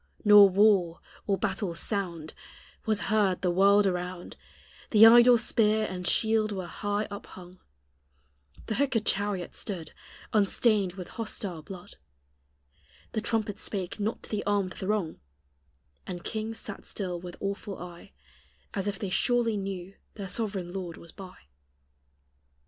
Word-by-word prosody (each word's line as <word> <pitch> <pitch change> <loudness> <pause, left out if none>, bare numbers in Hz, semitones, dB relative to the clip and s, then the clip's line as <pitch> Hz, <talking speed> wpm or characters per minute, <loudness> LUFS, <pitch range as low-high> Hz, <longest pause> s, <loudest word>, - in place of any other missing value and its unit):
Nor 205 -1 +9
war, 190 -4 +3 0.3
or 200 -2 +2
battle's 190 -4 -2
sound, 170 -7 -3 0.5
Was 215 -2 +2
heard 200 -4 +1
the 180 - +2
world 200 +3 +5
around 180 -1 -3 0.5
The 220 0 +8
idle 240 +1 +8
spear 220 -1 +2
and 180 -1 -4
shield 220 -1 +2
were 190 -3 -4
high 205 +4 -2
up 200 - -8
hung; 180 0 -13 1.1
The - - -3
hookèd 260 -3 +1
chariot 200 -2 -1
stood 175 -7 -5 0.4
Unstained 205 -2 +2
with 180 -2 -8
hostile 200 -6 -5
blood; 180 +2 -11 1.1
The 220 - -2
trumpet 215 -2 -1
spake 195 0 -4
not 210 +2 -2
to - - -11
the 210 -1 -2
armed 200 -3 0
throng; 190 -4 -2 0.9
And 175 -2 -6
kings 220 0 -4
sat 205 - -8
still 180 -4 -4
with 175 -1 -8
awful 200 0 -4
eye, 175 +2 -11 0.6
As 195 -1 -2
if 205 -1 -2
they 195 -2 -4
surely 240 +1 +2
knew 195 -2 -5 0.2
their 195 -3 -6
sovereign 195 -4 -3
Lord 180 -4 -5
was 170 - -13
by. 185 -2 -11
200 Hz, 140 wpm, -28 LUFS, 180-215 Hz, 1.1 s, Nor